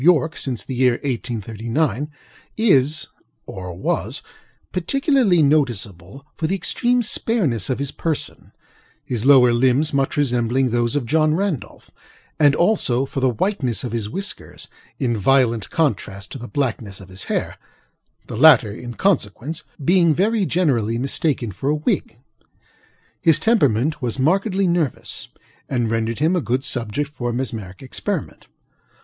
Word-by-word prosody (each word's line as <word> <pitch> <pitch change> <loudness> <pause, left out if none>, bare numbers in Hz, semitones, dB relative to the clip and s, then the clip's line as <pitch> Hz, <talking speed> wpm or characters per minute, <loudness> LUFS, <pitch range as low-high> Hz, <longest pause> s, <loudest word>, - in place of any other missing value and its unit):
Y., 165 -1 +5
since 130 -7 -3
the 130 - -6
year 125 0 +3
1839, 120 +3 -2 0.5
is 155 - +3 0.4
(or 90 -1 -7
was) 90 +2 -2 0.5
particularly 225 - +2
noticeable 120 - -1
for 160 - -1
the 195 - 0
extreme 240 +6 +1
spareness 175 - 0
of 130 - 0
his 140 0 -3
personŌĆöhis 130 -6 -6
lower 130 -4 +7
limbs 130 +5 +2
much 135 0 0
resembling 125 -2 +1
those 120 +1 +1
of 145 -4 0
John 155 +4 +2
Randolph; 190 - -3 0.5
and, 145 -2 +5
also, 135 - +2
for 135 - -4
the 130 -1 +3
whiteness 130 - -1
of 125 - -4
his 110 -3 -3
whiskers, 195 - -5 0.3
in 125 -5 0
violent 115 -1 +2
contrast 100 - -1
to 135 - -6
the 120 - -7
blackness 115 -9 -3
of 95 -1 -13
his 95 +1 -6
hairŌĆöthe - - -2 0.7
latter, 130 -4 +6
in 120 +3 -8
consequence, 160 - -1 0.2
being 170 -2 +4
very 205 +2 +1
generally 120 - +1
mistaken 130 -2 -1
for 135 +9 -3
a 150 - +2
wig. 150 -6 -1 1.0
His 165 -1 +5
temperament 150 - +2
was 120 -1 -2
markedly 190 +7 +1
nervous, 170 -6 -1 0.4
and 120 -4 0
rendered 115 0 -1
him 160 +5 +2
a 180 - +1
good 130 0 -1
subject 125 +1 -1
for 120 -4 -3
mesmeric 115 -5 -4
experiment. 130 - -4
135 Hz, 135 wpm, -21 LUFS, 115-160 Hz, 1.0 s, lower